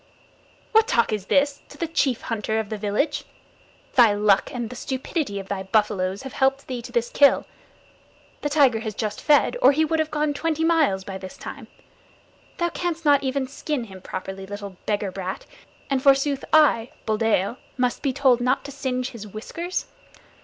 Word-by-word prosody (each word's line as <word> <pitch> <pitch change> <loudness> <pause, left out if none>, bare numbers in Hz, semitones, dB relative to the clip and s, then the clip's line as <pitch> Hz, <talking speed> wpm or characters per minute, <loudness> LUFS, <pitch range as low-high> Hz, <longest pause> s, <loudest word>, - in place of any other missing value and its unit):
"What 445 0 +5
talk 230 -2 +2
is 205 -3 -3
this 280 0 +2
to 285 - -13
the 335 - -1
chief 280 -7 0
hunter 220 -1 -2
of 220 -2 -2
the 215 - -3
village? 215 +9 0 0.7
Thy 235 -5 +6
luck 205 -1 +3
and 240 -2 -4
the - - -7
stupidity 260 - -3
of 195 - -8
thy 195 -1 -3
buffaloes 195 0 0
have 265 - -7
helped 270 +1 +1
thee 250 -2 -4
to 240 - -10
this 235 -1 0
kill. 285 -1 +5 1.0
The 290 - -1
tiger 275 -6 +4
has 220 -2 -5
just 210 -1 -3
fed, 300 +10 +3
or 395 - +7
he 315 +3 +2
would 320 +1 0
have 315 0 0
gone 300 -1 0
twenty 320 +1 -1
miles 315 - +2
by 190 0 -6
this 185 -1 -9
time. - - -8 0.9
Thou 345 -1 +1
canst 335 -2 -3
not 285 -1 +5
even 265 0 -1
skin 280 0 -3
him 190 -4 -11
properly, 190 +1 -6
little 200 -1 -7
beggar 205 -2 0
brat, 190 0 -5 0.4
and 270 -2 0
forsooth 275 0 +3
I, 270 -7 +5 0.2
Buldeo, 220 0 +1 0.2
must 250 -1 0
be 275 - +1
told 255 -2 +3
not 255 +3 +1
to 280 - -6
singe 260 -2 -3
his 215 -3 -9
whiskers. 330 - -4
250 Hz, 180 wpm, -24 LUFS, 210-285 Hz, 1.0 s, or